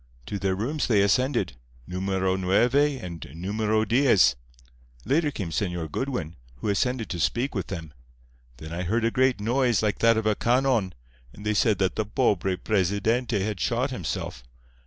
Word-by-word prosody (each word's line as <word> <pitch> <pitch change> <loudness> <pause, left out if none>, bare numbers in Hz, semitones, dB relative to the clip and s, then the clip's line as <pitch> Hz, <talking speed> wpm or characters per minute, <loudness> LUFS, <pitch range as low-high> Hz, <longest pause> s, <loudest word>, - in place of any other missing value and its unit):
To 100 - -4
their 95 -1 0
rooms 135 +10 -2
they 105 -4 +4
ascended—Numero 95 - -1
Nueve 95 +7 +2 0.3
and 85 -3 -7
Numero 110 +5 0
Diez. 120 - +4 0.7
Later 150 +2 +2
came 100 - -5
Señor 85 -4 -2
Goodwin, 110 - -3 0.2
who 60 - -4
ascended 120 +3 0
to 90 - -3
speak 120 - 0
with 95 -6 -3
them. 80 -5 -7 0.6
Then 80 +5 -8
I 85 - -3
heard 110 +6 0
a 115 - +2
great 130 -3 +2
noise 120 +1 +1
like 105 -1 0
that 115 0 +4
of 110 - -1
a 110 - +3
canon, 120 -5 +1 0.4
and 105 - -12
they 105 - +1
said 105 0 +3
that 95 -1 0
the 110 - 0
pobre 95 -2 +1
Presidente 105 +4 0
had 105 -1 -2
shot 125 +8 0
himself. 85 - -4
105 Hz, 160 wpm, -26 LUFS, 90-120 Hz, 0.7 s, they